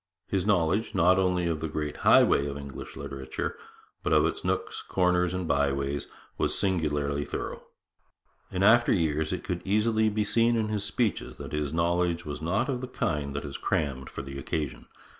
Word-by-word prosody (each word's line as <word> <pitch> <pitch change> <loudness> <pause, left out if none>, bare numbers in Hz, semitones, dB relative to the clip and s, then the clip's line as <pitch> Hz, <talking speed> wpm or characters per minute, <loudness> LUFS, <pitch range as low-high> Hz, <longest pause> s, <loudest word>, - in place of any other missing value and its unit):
His 95 -1 -1
knowledge, 100 +3 +2
not 90 +1 +5
only 90 -2 +1
of 85 -2 0
the 80 - -2
great 75 -1 -3
highways 70 +1 +5
of 70 - -5
English 70 -2 -8
literature, 65 -1 -5 0.5
but - - -2
of - - +5
its - - -2
nooks, - - -2
corners, 90 -1 +1
and 90 -2 -3
byways, 70 -1 0 0.3
was - - +1
singularly 75 -6 0
thorough. - - -5 0.9
In 95 +1 0
after 120 +3 +6
years 80 -3 +1
it 95 - -3
could 90 -2 -3
easily 110 +2 +2
be 105 0 0
seen 115 +3 +3
in 110 -2 0
his 105 -2 -1
speeches 100 0 -1
that - - -8
his 75 -1 -1
knowledge 85 +1 +1
was 75 0 -5
not 100 +10 0
of 130 -3 -2
the 130 - -4
kind 75 - -2
that 70 - -3
is 70 - -5
crammed 65 -3 -1
for - - -6
the 70 0 -7
occasion. 75 -1 -4
85 Hz, 180 wpm, -28 LUFS, 75-100 Hz, 0.9 s, after